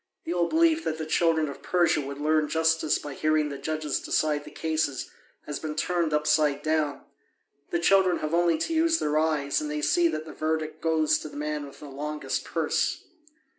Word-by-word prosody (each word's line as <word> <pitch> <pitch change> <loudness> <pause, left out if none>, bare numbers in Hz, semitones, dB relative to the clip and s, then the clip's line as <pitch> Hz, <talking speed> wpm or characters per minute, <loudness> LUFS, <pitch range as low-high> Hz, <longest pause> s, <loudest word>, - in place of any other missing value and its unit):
The 170 - -2
old 175 -1 +1
belief 330 0 +3
that 155 - -1
the 160 - -4
children 160 0 +2
of 140 - -8
Persia 170 -4 +2
would 140 0 -6
learn 155 +1 +2
justice 160 -1 +2
by 145 - -7
hearing 155 +1 +1
the 140 -1 -6
judges 155 0 -2
decide 150 -1 0
the - - -9
cases 155 -4 -2 0.3
has 150 -1 -4
been 155 -1 -5
turned 170 0 0
upside 150 -1 +2
down: 155 -2 0 0.7
the - - 0
children 185 +1 +4
have 155 +1 -4
only 170 -1 +3
to 330 - -2
use 325 0 +3
their 150 - +1
eyes 155 - 0
and 300 - -4
they 300 0 -3
see 350 -1 +3
that 155 - -3
the 160 - -9
verdict 155 0 -2
goes 155 -1 +2
to 155 - -7
the - - -10
man 150 -1 -3
with 140 - -14
the - - -8
longest 150 +2 -4
purse. - - -1
155 Hz, 200 wpm, -27 LUFS, 150-170 Hz, 0.7 s, children